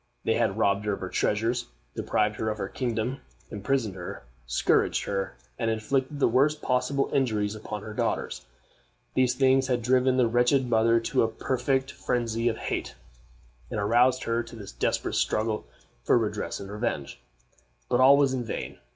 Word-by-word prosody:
They 115 - +2
had 110 -4 +1
robbed 100 -1 +2
her 105 - +1
of - - -4
her 95 - -4
treasures, 115 +5 0 0.3
deprived 105 0 0
her 110 - -1
of 105 - -3
her 95 - -3
kingdom, 125 +1 -2 0.3
imprisoned 110 0 -1
her, 90 -7 -7 0.2
scourged - - +2
her, 95 -9 -3 0.2
and 115 - 0
inflicted 130 +6 -1
the - - +4
worst 140 +6 +3
possible 135 +2 0
injuries 110 -6 +1
upon 105 -1 -6
her 110 - -7
daughters. - - -2 0.7
These 130 -1 +2
things 130 0 +3
had 125 -2 0
driven 130 +1 +3
the 125 -2 +4
wretched 125 +3 +3
mother 115 0 +4
to - - +1
a 115 - +3
perfect 130 +3 -1
phrensy 115 -1 0
of 110 - -3
hate, - - -4 0.7
and - - -3
aroused 125 +5 +3
her 115 0 0
to 115 0 -10
this 105 -3 -9
desperate - - -1
struggle 110 0 0 0.4
for - - +4
redress - - -2
and 100 0 -8
revenge. 105 - -3 0.7
But 125 - +1
all 135 +2 +7
was 140 -2 +3
in 125 -2 -1
vain. 115 - -5
115 Hz, 170 wpm, -27 LUFS, 105-130 Hz, 0.7 s, all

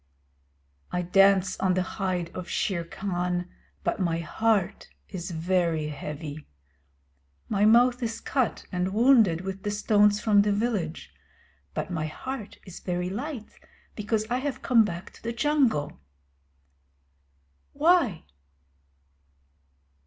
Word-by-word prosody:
I 180 - -1
dance 190 +1 +4
on 185 -1 +2
the 185 - +1
hide 185 -3 -3
of 180 -1 -6
Shere 175 -4 -1
Khan, 180 0 -2 0.4
but - - -1
my 170 -3 +1
heart 200 +3 0 0.2
is 180 -2 -5
very 165 -2 0
heavy. 150 +1 -7 1.0
My 205 0 +2
mouth 240 +3 +5
is 230 -2 -3
cut 260 -4 -1
and 185 +1 -1
wounded 225 -8 +5
with 190 0 -5
the 205 - -2
stones 210 0 +3
from 210 -2 +4
the 205 0 +1
village, 200 -6 -2 0.6
but - - -3
my 160 -3 -2
heart 260 - -6
is 185 -3 -10
very 180 0 -2
light, 250 +1 -6 0.4
because 215 0 -1
I 245 +2 0
have 280 0 -4
come 235 -3 +5
back 175 -3 -5
to - - -17
the 235 +1 -3
Jungle. 235 - +1 1.7
Why? 290 - +3
195 Hz, 125 wpm, -27 LUFS, 175-225 Hz, 1.7 s, mouth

